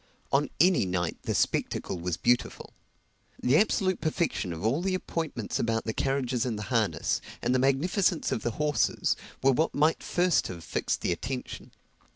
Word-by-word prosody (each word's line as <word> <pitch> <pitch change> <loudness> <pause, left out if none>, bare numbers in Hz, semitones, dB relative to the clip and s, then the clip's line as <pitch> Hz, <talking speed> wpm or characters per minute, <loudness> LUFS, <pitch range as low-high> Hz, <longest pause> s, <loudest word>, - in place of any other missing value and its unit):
On 140 +2 +2
any 175 - +4
night 90 -2 -1
the - - -2
spectacle 90 - 0
was 85 -1 -2
beautiful. 120 0 0 0.7
The 125 +3 +2
absolute 190 -3 +2
perfection 155 - -1
of 85 +4 -5
all 130 +9 +2
the 185 0 0
appointments 160 - -3
about 115 -1 0
the 110 - -2
carriages 130 -3 0
and 120 -4 -2
the 105 - -4
harness, 110 -4 +1 0.2
and 125 - 0
the 130 - +3
magnificence 160 +7 +1
of 110 - -1
the 120 - -1
horses, 150 -1 +1 0.3
were 135 - +6
what 155 +5 +1
might 155 +3 +2
first 180 0 +2
have 85 -3 -8
fixed - - -2
the - - 0
attention. 125 +9 -5
135 Hz, 170 wpm, -28 LUFS, 110-165 Hz, 0.7 s, were